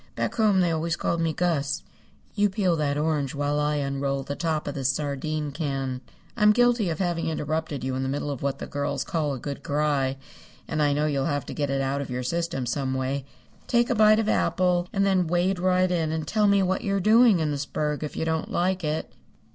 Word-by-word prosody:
"Back - - -1
home 210 -4 +3
they 175 -2 +2
always 165 +1 -1
called 170 -1 -1
me 165 -1 +1
Gus. 155 -3 -1 0.5
You 205 -1 +2
peel 190 -3 +1
that 145 -2 0
orange 150 -3 0
while 145 +1 0
I 150 0 +1
unroll 140 -1 -1
the 140 +1 -4
top 160 -2 -2
of 145 - -2
this 135 -2 -1
sardine 145 +1 -2
can. 135 -4 -3 0.3
I'm 210 -2 +5
guilty 240 -4 +3
of 160 - -2
having 175 -2 -1
interrupted 155 -2 -2
you 130 0 -2
in 130 - -2
the 130 - -1
middle 145 +1 -2
of 140 - -5
what 140 -1 -1
the - - -6
girls 145 0 -2
call 155 -5 -1
a - - -7
good 140 +2 -5
cry, 140 -2 0 0.5
and 155 -1 -1
I 145 -1 +3
know 150 +1 +1
you'll 140 -3 0
have 145 -1 -1
to - - -6
get 145 -2 -2
it 135 0 0
out 135 +1 -1
of 140 - -6
your 125 0 -3
system 170 -2 -2
some 130 +1 -1
way. 130 +1 -2 0.4
Take 240 0 +2
a - - +4
bite 215 0 +6
of 220 -1 0
apple 180 -4 +1
and 195 0 +1
then 185 -3 +2
wade 175 +2 +1
right 185 0 +2
in 165 -3 0
and 160 -1 -3
tell 210 +2 +2
me 200 -1 +4
what 190 0 0
you're 200 -1 0
doing 220 +1 +5
in 155 -2 0
this 140 0 -3
burg 150 0 -2
if 150 - -5
you - - -1
don't 160 0 -1
like 185 +1 0
it." 155 +1 -2
155 Hz, 230 wpm, -25 LUFS, 140-180 Hz, 0.5 s, bite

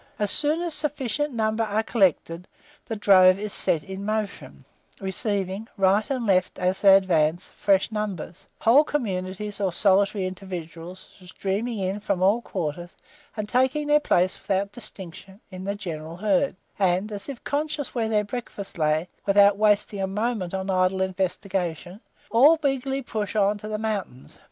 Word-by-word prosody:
As 210 -1 0
soon 305 +3 +2
as 340 -2 -2
a - - -2
sufficient 295 -1 -2
number 220 -1 0
are 215 0 0
collected, 180 -5 0 0.4
the 225 - -3
drove 185 -3 +6
is 210 0 -4
set 155 -3 +1
in 190 +3 -7
motion, 215 -1 -4 0.3
receiving, 195 +1 -2
right 195 +2 +2
and 255 -4 -2
left, 185 -3 +1
as 185 +1 -1
they 195 -1 +8
advance, 170 -3 +1
fresh 195 +1 +1
numbers; 205 -6 -5
whole 250 +7 +6
communities, 205 -6 -3
or 190 -2 +1
solitary 195 +1 +2
individuals, 185 -1 -8
streaming 200 +6 -3
in 195 +1 -2
from 200 -3 -1
all 205 +5 +3
quarters, 175 -4 -5 0.4
and 210 -1 -3
taking 260 +6 +1
their 295 0 +4
place, 185 -10 +1
without 200 +1 -1
distinction, 195 -3 -9
in 185 0 -8
the 200 +1 -2
general 165 -4 -7
herd; 205 +5 +1 0.2
and, 190 +2 +1
as 205 +5 -2
if 270 -4 -8
conscious 295 -1 -2
where 225 -3 -1
their 210 -1 +2
breakfast 205 -4 -7
lay, 155 +2 +1 0.2
without 200 0 +6
wasting 210 -1 +1
a 190 - 0
moment 210 -2 -2
on 190 0 -2
idle 185 0 +1
investigation, 185 -1 -3 0.3
all 285 +8 +6
eagerly 270 0 -1
push 215 -3 -4
on 205 0 +3
to 210 +1 -8
the 215 0 -3
mountains. 210 - -5
200 Hz, 160 wpm, -25 LUFS, 185-220 Hz, 0.4 s, they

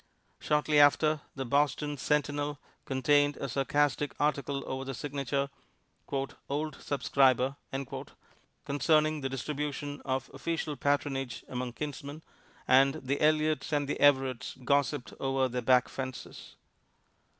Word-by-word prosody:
Shortly 150 0 +2
after, 150 +1 +5
the 135 -1 -3
Boston 145 +2 +1
"Centinel" 145 +1 0 0.3
contained 145 +2 +2
a 140 - -3
sarcastic 145 +2 0
article 140 -2 0
over 130 0 -4
the 135 -1 -5
signature, 140 0 -2 1.0
"Old 150 +2 -2
Subscriber," 135 -2 +2 1.1
concerning 155 +2 +2
the 135 - -2
distribution 145 +1 -4
of 130 -1 -2
official 165 -3 -3
patronage 140 -3 -1
among 125 -1 -4
kinsmen, 145 +2 -6 0.4
and 135 +2 +5
the 140 -2 -3
Eliots 155 +1 +2
and 145 -2 +1
the 145 - -2
Everetts 130 -3 +3
gossiped 140 -1 +1
over 135 -1 +1
their 125 0 -3
back 125 +1 +4
fences. 130 -1 -7
140 Hz, 115 wpm, -30 LUFS, 135-150 Hz, 1.1 s, after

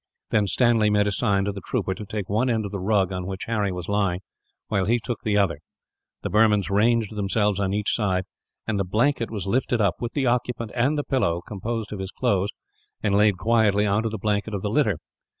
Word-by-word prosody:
Then 105 -2 +2
Stanley 115 +2 +3
made 105 0 +3
a 105 - +1
sign, 100 -2 +1
to 100 - 0
the 100 -1 -7
trooper, 95 - -2
to 105 +3 -8
take 105 -2 -4
one 115 +6 +1
end 110 -3 0
of 100 - -5
the 100 - -4
rug 95 -1 +1
on 90 -1 -4
which 95 -1 -5
Harry 105 -4 0
was 90 -2 -5
lying; 100 -3 0 0.5
while 95 -2 0
he 120 +4 +2
took 120 +1 -4
the 105 -1 +1
other. 90 -7 +1 0.6
The - - -2
Burmans 105 -2 +3
ranged 110 +1 +2
themselves 105 0 +1
on 95 -1 0
each 105 0 0
side; 95 -4 +1 0.4
and 110 -3 -1
the - - +2
blanket 115 +6 +1
was 105 -4 -4
lifted 120 +3 0
up, 100 -4 +2
with 120 -1 -4
the 140 -2 0
occupant 120 -2 -1
and 135 +5 +1
the 145 - 0
pillow 85 -13 0
composed 110 +1 -4
of 100 - -6
his 95 0 -4
clothes, 100 -4 0 0.5
and 105 -2 +1
laid 105 -2 +4
quietly 110 -1 +3
on 100 +1 +2
to 115 - -1
the 110 - -4
blanket 105 +1 -1
of 95 - -4
the 105 - -1
litter. 110 - +2
105 Hz, 225 wpm, -24 LUFS, 100-115 Hz, 0.6 s, laid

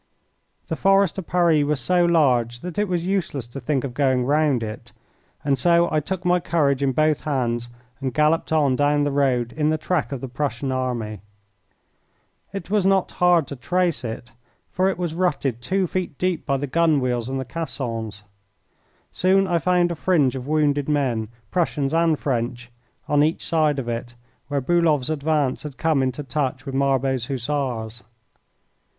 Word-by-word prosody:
The - - -2
Forest 195 -1 +3
of 185 - -8
Paris 170 -4 +3
was 145 -1 0
so 175 +7 +2
large 125 -8 +2
that 180 +1 -5
it 210 - +1
was 175 -2 -1
useless 180 - -1
to 120 +3 -8
think 135 +1 -1
of 135 -3 -4
going 130 -2 +1
round 145 -3 +2
it, 110 -1 -7 0.5
and 135 -3 +1
so 170 +4 +4
I 155 - +2
took 185 +4 -5
my 180 0 +3
courage 145 -5 +1
in 135 -1 +2
both 155 +2 +2
hands 120 -5 -1 0.3
and 135 -2 -2
galloped 150 +6 +1
on 145 -5 +3
down 145 +1 +2
the 145 - 0
road 130 -4 +1
in 155 -1 +1
the 155 - +1
track 155 -1 -1
of 135 - -3
the 135 - -5
Prussian 135 +1 -3
army. 120 -6 -3 1.3
It 195 -1 -7
was 210 -2 +3
not 190 -1 +2
hard 175 -3 +5
to 140 - -5
trace 175 +5 0
it, 120 +2 -6 0.4
for 185 +1 +2
it 190 - -2
was 175 -3 -2
rutted 145 -9 -1
two 190 +9 0
feet 180 -5 -3
deep 180 -3 -1
by 140 - +1
the 140 - -2
gun 155 +2 +2
wheels 125 -2 -1
and 135 0 -2
the 130 - -4
caissons. 115 -8 -5 0.9
Soon 190 +2 +3
I 175 -2 +1
found 175 +1 +2
a - - -2
fringe 155 -6 +2
of 130 0 -6
wounded 145 -2 +1
men, 130 -7 0 0.2
Prussians 150 -5 0
and 165 -1 +3
French, 120 -2 -3 0.4
on 145 0 +3
each 155 +2 +1
side 155 -3 +2
of 130 -3 -4
it, 120 +1 -4 0.3
where 140 -1 -1
Bulow's 155 -2 +2
advance 150 -3 0
had 150 -3 -8
come 160 -4 +2
into 130 +2 -2
touch 135 -2 -2
with 135 - -5
Marbot's 135 -2 +1
Hussars. 125 -4 -3
145 Hz, 180 wpm, -23 LUFS, 130-170 Hz, 1.3 s, hard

